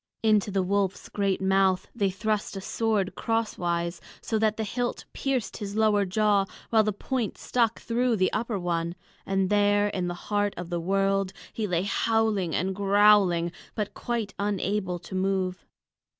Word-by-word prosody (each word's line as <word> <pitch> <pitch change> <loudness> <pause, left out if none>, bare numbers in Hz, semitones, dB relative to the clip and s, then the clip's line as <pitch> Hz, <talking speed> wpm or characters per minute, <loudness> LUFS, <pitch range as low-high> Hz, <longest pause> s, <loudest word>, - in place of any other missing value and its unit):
Into 215 -2 +3
the 195 -1 +1
wolf's 195 0 -1
great 195 -2 0
mouth 190 -1 +2
they 200 -4 +1
thrust 210 +2 -2
a - - -5
sword 210 -2 0
crosswise, 175 -7 -1 0.2
so 220 - -1
that 215 0 +2
the 220 - -1
hilt 240 +3 -3
pierced 265 -5 -2
his 200 -1 -5
lower 215 -2 +3
jaw 205 +1 +2 0.3
while 220 -1 +6
the 215 0 +1
point 230 +2 -3
stuck 230 -2 0
through 240 +1 +1
the 185 -3 +1
upper 230 -3 -1
one; 170 -1 -2 0.3
and 195 0 +1
there 205 0 +3
in 185 -3 -2
the 175 - -3 0.2
heart 205 0 +1
of 175 0 -6
the 170 -1 -1
world 195 +1 +1 0.2
he 220 -2 -2
lay 175 -1 0
howling 210 -4 +1
and 190 +3 0
growling, 200 -4 +4 0.2
but 210 -2 -3
quite 230 -4 -3
unable 200 -2 -1
to 175 +2 -11
move. 185 -1 -1
200 Hz, 165 wpm, -27 LUFS, 185-215 Hz, 0.3 s, while